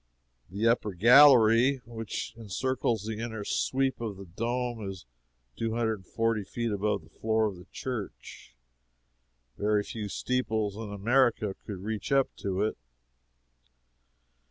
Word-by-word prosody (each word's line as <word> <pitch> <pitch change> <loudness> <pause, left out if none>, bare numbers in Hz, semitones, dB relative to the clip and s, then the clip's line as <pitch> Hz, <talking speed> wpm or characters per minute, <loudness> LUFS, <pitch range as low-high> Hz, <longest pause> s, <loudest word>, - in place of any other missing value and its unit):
The 100 +5 0
upper 115 -3 +2
gallery 125 +2 +7
which 115 -2 -5
encircles 115 0 -1
the 110 -1 -4
inner 110 -2 -4
sweep 135 +4 0
of 110 -4 -4
the 100 - -9
dome 115 +3 -3
is 95 -7 -9 0.5
two 115 0 -2
hundred 115 -1 +1
and 95 - -20
forty 115 -2 0
feet 115 +3 -3
above 105 -3 -1
the 80 - -19
floor 110 0 +1
of 105 -3 -2
the 90 +2 -14
church 110 - -7 1.0
very 105 0 +2
few 105 -1 -6
steeples 110 -4 -1
in 110 -1 -6
America 115 0 +2
could 95 -3 -6
reach 110 +2 -4
up 135 -1 +2
to 95 0 -1
it. 110 - -2
110 Hz, 135 wpm, -29 LUFS, 100-120 Hz, 1.0 s, gallery